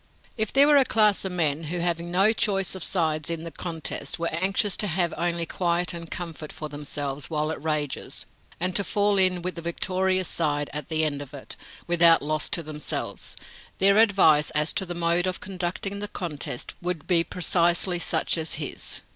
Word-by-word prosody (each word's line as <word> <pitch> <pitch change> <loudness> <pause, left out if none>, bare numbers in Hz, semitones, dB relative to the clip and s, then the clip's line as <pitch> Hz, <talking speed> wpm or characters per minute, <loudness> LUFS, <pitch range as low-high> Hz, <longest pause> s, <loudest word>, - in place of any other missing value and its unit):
"If 220 -2 -1
there 275 +1 +5
were 295 0 +5
a 275 - +6
class 215 -5 +2
of 190 - -3
men 160 -3 0
who, 170 +4 -3
having 170 0 -1
no 195 +5 +4
choice 195 -4 0
of 190 -3 -6
sides 160 -4 +1
in 165 -1 -2
the 165 - -6
contest, 160 -3 -3
were 170 -1 -3
anxious 195 +4 +1
to 210 - +1
have 175 -1 0
only 170 0 -1
quiet 175 +1 -1
and 170 -1 -7
comfort 165 -3 -6
for 155 - -7
themselves 145 -1 -3
while 155 -1 -1
it 160 - -6
rages, 150 -3 -3 0.3
and 180 +1 0
to 200 - +4
fall 205 +1 +1
in 185 -2 +2
with 180 0 -3
the 170 - -8
victorious 185 +2 -1
side 145 -3 -1
at 150 -1 -4
the 160 -1 +1
end 145 -2 0
of 145 +1 -9
it, 140 - -8 0.3
without 170 -2 +6
loss 155 +1 -1
to 170 - -1
themselves, 150 -1 -3 0.4
their 200 +2 +5
advice 185 -9 +4
as 150 +1 +3
to 190 - +1
the 175 - -5
mode 170 +1 +1
of 185 - -3
conducting 190 +1 -4
the 205 - -5
contest 155 -10 -5
would 175 -4 -4
be 170 -3 +3
precisely 175 +1 +2
such 165 - +1
as 160 0 -1
his." 145 -2 -3
170 Hz, 195 wpm, -24 LUFS, 155-185 Hz, 0.4 s, a